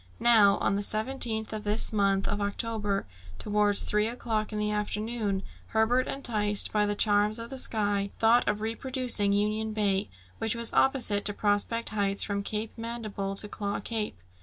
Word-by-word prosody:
Now, 210 -4 +5
on 200 - 0
the - - -1
17th 220 +1 -1
of 215 -1 -5
this 210 +1 +2
month 195 -2 +2
of 205 - -2
October, 205 -1 -2 0.3
towards 205 - +3
three 210 +1 +2
o'clock 225 -2 -2
in 215 - -4
the 210 0 -1
afternoon, 210 -1 -2 0.2
Herbert, 225 +3 +2
enticed 210 -6 0
by 210 -1 +2
the 205 - -1
charms 210 +1 +2
of 230 +2 -8
the 265 - -5
sky, 205 -4 +1
thought 230 +2 +4
of 210 0 -1
reproducing 230 -2 0
Union 215 +2 0
Bay, 200 - 0 0.3
which 225 0 0
was 235 -1 -1
opposite 240 -7 +2
to 205 - +2
Prospect 210 +3 0
Heights, 200 -2 +1
from 200 -1 -1
Cape 215 +2 -4
Mandible 215 -4 -4
to 210 - -1
Claw 200 -1 -4
Cape. 215 - -3
210 Hz, 165 wpm, -28 LUFS, 205-225 Hz, 0.3 s, Now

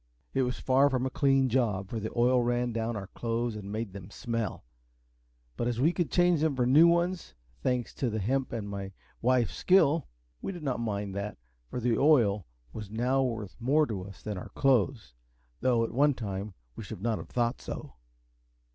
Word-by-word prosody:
It 135 - +2
was 125 -1 -1
far 135 +2 +4
from 130 -1 0
a 130 - -2
clean 135 -1 +3
job, 110 -6 0
for 115 - -3
the 110 +1 -4
oil 125 +1 +4
ran 120 0 0
down 115 0 -2
our 100 -2 -4
clothes 115 +2 -2
and 100 -1 -7
made 110 -2 -4
them 100 -1 -9
smell; 115 - -3 0.9
but 120 - -1
as 120 -1 -1
we 160 +7 +3
could 175 -3 -1
change 175 -3 +3
them 155 -3 +2
for 125 -1 +1
new 150 +7 +7
ones, 170 +1 0 0.3
thanks 125 -3 -1
to 130 - -1
the 110 - -2
hemp 130 +6 0
and 110 -3 -4
my 100 -1 -5 0.3
wife's 125 -1 +2
skill, 165 -5 +4 0.3
we - - -3
did 175 -3 -8
not 130 -4 -1
mind 100 -4 -2
that, 100 +2 -4 0.3
for - - -4
the 120 -2 +1
oil 115 -9 +4 0.3
was 105 -3 -7
now 125 +5 +1
worth 115 -6 -3
more 145 +6 +3
to 105 -8 -4
us 100 0 -12
than 105 -3 -4
our - - -9
clothes, 130 - +2 0.5
though 120 -3 +2
at 115 - -2
one 145 +3 +3
time 100 -3 -5 0.2
we - - -7
should 95 - -8
not 115 -2 0
have - - -9
thought 120 -1 0
so. - - -7
120 Hz, 200 wpm, -29 LUFS, 105-135 Hz, 0.9 s, new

